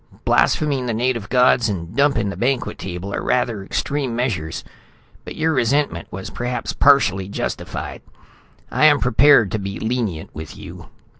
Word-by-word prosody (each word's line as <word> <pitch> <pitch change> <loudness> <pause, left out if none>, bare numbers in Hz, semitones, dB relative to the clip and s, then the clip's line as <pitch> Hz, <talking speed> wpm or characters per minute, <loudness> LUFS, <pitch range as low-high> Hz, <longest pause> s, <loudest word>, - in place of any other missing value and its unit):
Blaspheming 140 -5 +2
the 115 - -1
native 120 -3 -1
gods 125 -2 +4
and 85 -4 -5
dumping 140 -7 +2
the - - -7
banquet 130 +2 -1
table 95 +2 -6
are - - -2
rather 115 -5 0
extreme 135 +4 -2
measures, 100 -11 -2 0.6
but - - -8
your 160 0 +1
resentment 135 - 0
was 95 +1 -7
perhaps 125 +1 -3
partially 95 -10 +3
justified. 100 - -5 0.7
I - - +3
am 145 -2 +6
prepared 125 -3 +5
to 110 - -1
be 100 0 -5
lenient 110 -8 -3
with 80 0 -9
you." - - -10
120 Hz, 150 wpm, -20 LUFS, 100-135 Hz, 0.7 s, am